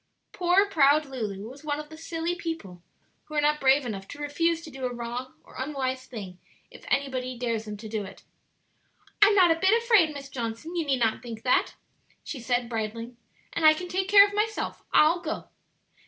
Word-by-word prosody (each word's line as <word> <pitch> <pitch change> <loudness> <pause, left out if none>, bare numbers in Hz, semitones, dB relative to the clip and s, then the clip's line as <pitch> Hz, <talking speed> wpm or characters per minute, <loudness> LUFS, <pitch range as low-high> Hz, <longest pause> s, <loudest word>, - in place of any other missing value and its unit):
Poor 360 +2 +3
proud 300 -4 +4
Lulu 215 -7 -5
was 270 +5 -12
one 295 -1 -2
of 300 0 -8
the 315 - -10
silly 330 +1 -3
people 325 - -6 0.4
who 305 - -9
are 295 - +3
not 300 +1 +2
brave 270 +1 +4
enough 195 -4 -5
to - - -9
refuse 330 +3 0
to 310 - -10
do 265 -1 -5
a - - -5
wrong 240 +2 -6
or - - -18
unwise 260 -2 -3
thing 195 -7 -8 0.3
if - - -14
anybody 260 -2 -1
dares 230 -2 -2
them 210 -1 -6
to 220 +2 -9
do 215 -1 -3
it. 195 - -11 1.0
"I'm 410 0 +7
not 360 -4 +6
a 330 - +1
bit 385 +6 +4
afraid, 425 -10 +5
Miss 280 -2 -8
Johnson; 245 +6 -5
you 330 -3 -1
need 265 -3 +1
not 225 -1 +1
think 230 -2 -8
that," 255 - +2 0.5
she 275 - -6
said, 245 0 0
bridling; 230 +1 -4 0.4
"and 335 - -2
I 310 0 +8
can 360 +3 -6
take 375 +1 -1
care 400 0 +9
of 405 - -9
myself. 430 +1 -2
I'll 320 +3 +5
go." 320 -2 -5
275 Hz, 200 wpm, -27 LUFS, 235-330 Hz, 1.0 s, care